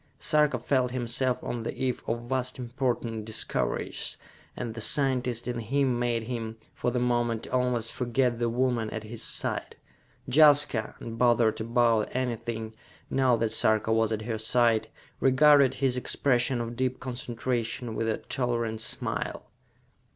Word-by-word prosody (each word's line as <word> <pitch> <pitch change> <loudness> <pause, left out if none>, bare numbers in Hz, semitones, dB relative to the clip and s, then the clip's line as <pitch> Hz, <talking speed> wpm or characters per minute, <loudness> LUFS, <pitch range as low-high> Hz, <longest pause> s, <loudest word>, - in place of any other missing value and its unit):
Sarka 150 -4 +3
felt 125 +1 +1
himself 125 +1 -1
on 120 - -3
the 115 - -4
eve 130 -2 -1
of 120 +1 -2
vast 130 +1 -2
important 120 -3 -2
discoveries, 110 0 -2 0.4
and 120 -2 -4
the 115 - -7
scientist 125 -2 +1
in 120 -1 -2
him 125 +2 0
made 120 -2 0
him, 115 -1 -5 0.2
for - - -1
the 125 - -2
moment, 120 -2 0
almost 125 -2 0
forget 125 -1 0
the 120 -1 +1
woman 120 -2 0
at 110 0 -5
his 110 +1 -6
side. - - -2 0.5
Jaska, 145 -6 +4
unbothered 115 -1 +2
about 115 -1 +2
anything, 115 -3 -3 0.4
now 130 -2 +3
that 115 -1 0
Sarka 110 0 +3
was 115 0 +2
at 110 0 -2
her 110 -1 -3
side, 115 -1 +2 0.3
regarded 140 0 +5
his 130 -2 +1
expression 125 -1 +1
of 120 0 -5
deep 130 +1 -1
concentration 120 -2 -3
with 115 +1 -1
a 110 - 0
tolerant 115 -3 -2
smile. - - -3
120 Hz, 145 wpm, -28 LUFS, 115-130 Hz, 0.5 s, regarded